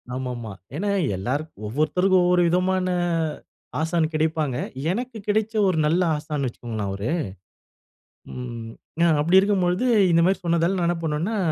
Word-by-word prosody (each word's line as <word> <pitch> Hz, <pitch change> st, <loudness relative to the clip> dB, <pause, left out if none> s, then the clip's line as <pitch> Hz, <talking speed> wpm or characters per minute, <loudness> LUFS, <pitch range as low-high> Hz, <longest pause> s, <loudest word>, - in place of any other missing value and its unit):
ஆமாமா. 125 Hz, -4 st, -4 dB, 0.2 s
ஏன்னா 200 Hz, +6 st, -1 dB, 0.3 s
எல்லோருக்கும் 130 Hz, -, -4 dB
ஒவ்வொருத்தருக்கும் 180 Hz, -, +2 dB
ஒவ்வொரு 180 Hz, 0 st, +4 dB
விதமான 185 Hz, +2 st, +1 dB, 0.9 s
ஆசான் 160 Hz, 0 st, +1 dB
கிடைப்பாங்க. 155 Hz, -3 st, 0 dB, 0.4 s
எனக்கு 240 Hz, +4 st, -4 dB
கிடச்ச 215 Hz, +1 st, +1 dB
ஒரு 185 Hz, -3 st, +1 dB
நல்ல 165 Hz, +4 st, +2 dB
ஆசான்னு 150 Hz, -2 st, -3 dB
வச்சுக்கொள்ளுங்களே 115 Hz, -3 st, -5 dB
அவரு. 100 Hz, +5 st, -3 dB, 1.2 s
ம். 120 Hz, -2 st, -6 dB, 0.3 s
அ -, -, +6 dB
அப்படி 170 Hz, +6 st, +5 dB
இருக்கும் 200 Hz, -1 st, +2 dB
பொழுது 180 Hz, +7 st, +1 dB, 0.3 s
இந்த 170 Hz, 0 st, +4 dB
மாதிரி 190 Hz, +2 st, +2 dB
சொன்னதால 170 Hz, +2 st, +2 dB
நான் 170 Hz, -, +1 dB
என்ன 175 Hz, 0 st, 0 dB
பண்ணேன்னா 160 Hz, +8 st, -1 dB
165 Hz, 135 wpm, -24 LUFS, 135-185 Hz, 1.2 s, அ